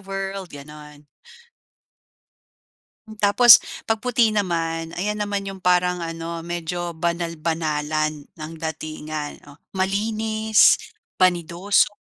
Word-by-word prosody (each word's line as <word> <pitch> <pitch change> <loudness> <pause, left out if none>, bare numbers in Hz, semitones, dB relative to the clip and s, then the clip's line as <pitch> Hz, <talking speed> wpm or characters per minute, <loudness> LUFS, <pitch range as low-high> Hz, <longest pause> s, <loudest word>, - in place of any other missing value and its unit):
world, 195 -1 -5
gano'n. 150 0 -12 2.1
Tapos 235 +4 +8 0.2
'pag 225 -1 -1
puti 240 -2 +2
naman 165 -5 -2
ayan 210 +3 -2
naman 205 -1 -2
'yong 195 -1 -7
parang 180 0 +2
ano 165 0 -5
medyo 175 0 -4
banal-banalan 155 -3 -2 0.2
ng 155 +1 -7
datingan. 155 -1 -5
Oh, 145 - -17 0.2
malinis, 215 +3 +2 0.4
banidoso, 180 +3 +2
175 Hz, 90 wpm, -22 LUFS, 160-200 Hz, 2.1 s, Tapos